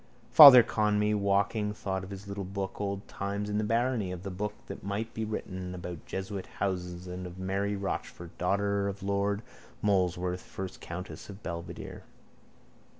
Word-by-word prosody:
Father 130 Hz, -3 st, +12 dB
Conmee, 105 Hz, -1 st, +1 dB
walking, 105 Hz, +1 st, +1 dB
thought 95 Hz, -2 st, -3 dB
of 95 Hz, -, -8 dB
his 100 Hz, 0 st, -8 dB
little 100 Hz, 0 st, -4 dB
book 95 Hz, +1 st, -4 dB
Old 100 Hz, 0 st, -3 dB
Times 100 Hz, +1 st, -3 dB
in 105 Hz, -, +1 dB
the -, -, 0 dB
Barony 115 Hz, +1 st, +1 dB
and -, -, -3 dB
of 85 Hz, -, -12 dB
the 100 Hz, -, -4 dB
book 105 Hz, +3 st, -3 dB
that -, -, -8 dB
might 105 Hz, +3 st, -3 dB
be 110 Hz, -, -3 dB
written 95 Hz, -4 st, -4 dB
about 90 Hz, -2 st, -7 dB
jesuit 95 Hz, 0 st, -4 dB
houses 90 Hz, -2 st, -2 dB
and 90 Hz, 0 st, -6 dB
of 90 Hz, +1 st, -10 dB
Mary 100 Hz, +2 st, -1 dB
Rochfort, 95 Hz, -3 st, -5 dB
daughter 100 Hz, +2 st, +1 dB
of 100 Hz, 0 st, -5 dB
lord 100 Hz, +1 st, 0 dB, 0.4 s
Molesworth, 90 Hz, -2 st, +1 dB
first 95 Hz, -1 st, -7 dB
countess 85 Hz, -1 st, -7 dB
of 100 Hz, +1 st, -10 dB
Belvedere. 85 Hz, -1 st, -6 dB
100 Hz, 165 wpm, -30 LUFS, 90-105 Hz, 0.4 s, Father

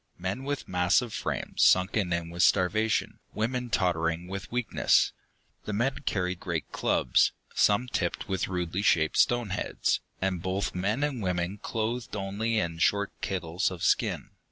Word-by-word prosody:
Men 95 Hz, +9 st, -4 dB
with 145 Hz, -1 st, -3 dB
massive 90 Hz, +6 st, +2 dB
frames, -, -, -3 dB
sunken 95 Hz, +1 st, +4 dB
in 85 Hz, -1 st, -2 dB
with 85 Hz, +1 st, -2 dB
starvation, 100 Hz, +4 st, +2 dB, 0.2 s
women 125 Hz, +3 st, -1 dB
tottering 85 Hz, -4 st, 0 dB
with 95 Hz, +1 st, -6 dB
weakness. 125 Hz, -1 st, +2 dB, 0.5 s
The 105 Hz, -, -3 dB
men 125 Hz, +6 st, 0 dB
carried 90 Hz, -2 st, -1 dB
great 85 Hz, -3 st, -4 dB
clubs, 60 Hz, -, +2 dB, 0.2 s
some 105 Hz, +5 st, +3 dB
tipped 125 Hz, -, -2 dB
with 95 Hz, -3 st, -1 dB
rudely 90 Hz, 0 st, -2 dB
shaped 80 Hz, -6 st, +2 dB
stone 120 Hz, -4 st, +3 dB
heads, -, -, 0 dB, 0.2 s
and 95 Hz, -2 st, -1 dB
both 95 Hz, +2 st, -2 dB
men 105 Hz, +9 st, 0 dB
and 140 Hz, -5 st, -1 dB
women 90 Hz, +1 st, -2 dB
clothed 115 Hz, +2 st, -3 dB
only 105 Hz, +3 st, -1 dB
in 85 Hz, -4 st, -1 dB
short 100 Hz, +4 st, +2 dB
kittles 90 Hz, 0 st, -1 dB
of 90 Hz, -3 st, -7 dB
skin. -, -, +1 dB
95 Hz, 150 wpm, -28 LUFS, 90-110 Hz, 0.5 s, sunken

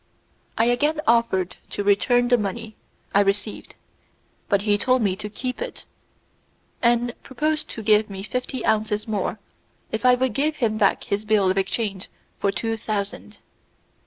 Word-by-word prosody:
I 225 Hz, -, +4 dB
again 295 Hz, +6 st, +2 dB
offered 225 Hz, -6 st, +2 dB
to 205 Hz, -, -3 dB
return 245 Hz, +5 st, +3 dB
the 245 Hz, -, +5 dB
money 215 Hz, +2 st, -4 dB, 0.4 s
I 200 Hz, -, +5 dB
received, 205 Hz, +1 st, -2 dB, 0.7 s
but 200 Hz, -1 st, +2 dB
he 205 Hz, -1 st, +3 dB
told 255 Hz, +3 st, +2 dB
me 190 Hz, -3 st, +1 dB
to 210 Hz, -, -5 dB
keep 250 Hz, -, -4 dB
it, -, -, -6 dB, 1.0 s
and 240 Hz, 0 st, +2 dB
proposed 305 Hz, +4 st, -2 dB
to 225 Hz, -, -6 dB
give 210 Hz, 0 st, +4 dB
me 195 Hz, -1 st, -6 dB
fifty 250 Hz, +3 st, -3 dB
ounces 215 Hz, 0 st, 0 dB
more 215 Hz, 0 st, -1 dB, 0.5 s
if 220 Hz, -, -3 dB
I 250 Hz, 0 st, +6 dB
would 255 Hz, -2 st, 0 dB
give 300 Hz, +6 st, 0 dB
him 220 Hz, -6 st, 0 dB
back 200 Hz, -, +3 dB
his 200 Hz, +1 st, -2 dB
bill 210 Hz, -3 st, +3 dB
of 190 Hz, -, -2 dB
exchange 195 Hz, 0 st, -2 dB, 0.3 s
for 200 Hz, -, +1 dB
two 225 Hz, +2 st, -2 dB
thousand. 210 Hz, 0 st, -4 dB
220 Hz, 160 wpm, -23 LUFS, 205-245 Hz, 1.0 s, I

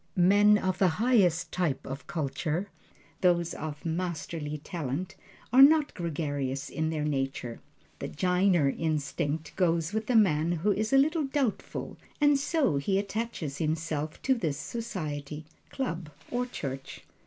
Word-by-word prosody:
Men 205 Hz, +3 st, +6 dB
of 185 Hz, -2 st, -1 dB
the 190 Hz, -, +5 dB
highest 205 Hz, -8 st, +3 dB
type 170 Hz, -7 st, -1 dB
of 135 Hz, +2 st, -7 dB
culture 160 Hz, +4 st, -2 dB, 0.5 s
those 175 Hz, -2 st, +3 dB
of 150 Hz, 0 st, -6 dB
masterly 165 Hz, -3 st, -3 dB
talent 155 Hz, +1 st, -4 dB, 0.4 s
are 260 Hz, -, +8 dB
not 300 Hz, +1 st, +6 dB
gregarious 145 Hz, -6 st, -3 dB
in 160 Hz, 0 st, -1 dB
their 155 Hz, -2 st, -2 dB
nature. 135 Hz, -4 st, -2 dB, 0.4 s
The -, -, -4 dB
"jiner" 180 Hz, -2 st, +2 dB
instinct 155 Hz, 0 st, -2 dB
goes 170 Hz, -1 st, +1 dB
with 220 Hz, +1 st, -2 dB
a 250 Hz, -, +2 dB
man 170 Hz, -6 st, +4 dB
who 175 Hz, +5 st, +1 dB
is 215 Hz, +2 st, -1 dB
a 270 Hz, -, +6 dB
little 305 Hz, +3 st, +3 dB
doubtful, 270 Hz, -4 st, -2 dB, 0.2 s
and 290 Hz, -1 st, +4 dB
so 280 Hz, -, +1 dB
he 190 Hz, +8 st, +1 dB
attaches 200 Hz, -8 st, -3 dB
himself 155 Hz, -1 st, -2 dB
to 270 Hz, -, +4 dB
this 160 Hz, -, -1 dB
society, 155 Hz, -9 st, -5 dB, 0.2 s
club 170 Hz, -, -3 dB, 0.2 s
or 245 Hz, +1 st, -1 dB
church. 135 Hz, -, -6 dB
170 Hz, 140 wpm, -29 LUFS, 150-210 Hz, 0.5 s, are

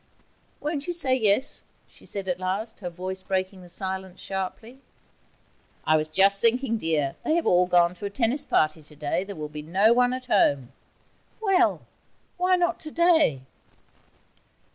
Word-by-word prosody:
'Won't 295 Hz, 0 st, -3 dB
you 350 Hz, -, -1 dB
say 295 Hz, -7 st, +2 dB
yes?' 225 Hz, +1 st, +1 dB, 0.2 s
she -, -, -18 dB
said 195 Hz, -2 st, -4 dB
at 180 Hz, -1 st, -1 dB
last, 195 Hz, +5 st, -3 dB
her 180 Hz, -3 st, -5 dB
voice 185 Hz, +2 st, -6 dB
breaking 185 Hz, 0 st, -3 dB
the 175 Hz, -, -13 dB
silence 190 Hz, 0 st, -5 dB
sharply. 195 Hz, +6 st, -6 dB, 1.1 s
'I 155 Hz, -, +4 dB
was 155 Hz, 0 st, -1 dB
just 195 Hz, +5 st, +3 dB
thinking, 230 Hz, 0 st, +1 dB
dear: 155 Hz, -5 st, -1 dB
they 315 Hz, -, +1 dB
have 340 Hz, -, 0 dB
all 180 Hz, 0 st, +4 dB
gone 175 Hz, -1 st, +4 dB
to 185 Hz, -, -8 dB
a -, -, -2 dB
tennis 235 Hz, +6 st, 0 dB
party 155 Hz, +1 st, +1 dB
today. 150 Hz, +3 st, -3 dB
There'll 185 Hz, -7 st, -6 dB
be 150 Hz, 0 st, -8 dB
no 195 Hz, +9 st, +3 dB
one 245 Hz, +1 st, +3 dB
at 255 Hz, 0 st, -5 dB
home.' 140 Hz, -, +2 dB, 0.7 s
'Well! 380 Hz, -5 st, +2 dB, 0.6 s
why 365 Hz, +1 st, +3 dB
not 350 Hz, -1 st, 0 dB
today?' 320 Hz, -, +2 dB
195 Hz, 155 wpm, -25 LUFS, 175-255 Hz, 1.1 s, I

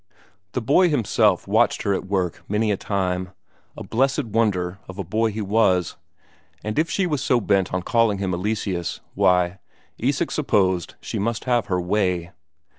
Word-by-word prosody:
The 125 Hz, -, -2 dB
boy 160 Hz, +9 st, +4 dB
himself 110 Hz, -, +2 dB
watched 110 Hz, +4 st, +2 dB
her 100 Hz, -, +1 dB
at 95 Hz, -, -3 dB
work 95 Hz, -3 st, -1 dB
many 105 Hz, +1 st, +1 dB
a -, -, +2 dB
time; 90 Hz, -2 st, -2 dB, 0.4 s
a -, -, -6 dB
blessed 135 Hz, +5 st, +1 dB
wonder 100 Hz, -5 st, 0 dB
of 95 Hz, -, -9 dB
a 100 Hz, -, -3 dB
boy 110 Hz, +6 st, 0 dB
he 110 Hz, +1 st, -4 dB
was, 95 Hz, -4 st, +2 dB, 0.7 s
and 110 Hz, +5 st, -2 dB
if 165 Hz, -, +1 dB
she 195 Hz, -, 0 dB
was 150 Hz, -6 st, -1 dB
so 125 Hz, -, +3 dB
bent 100 Hz, -3 st, +1 dB
on 90 Hz, -1 st, -2 dB
calling 115 Hz, -3 st, +2 dB
him 95 Hz, -1 st, -2 dB
Eleseus, 90 Hz, -2 st, -2 dB
why, 90 Hz, -1 st, +2 dB, 0.4 s
Isak -, -, 0 dB
supposed 95 Hz, -4 st, +1 dB
she -, -, -4 dB
must 115 Hz, +3 st, -1 dB
have 120 Hz, -4 st, +1 dB
her 90 Hz, -3 st, 0 dB
way. 90 Hz, -2 st, 0 dB
100 Hz, 170 wpm, -23 LUFS, 90-115 Hz, 0.7 s, boy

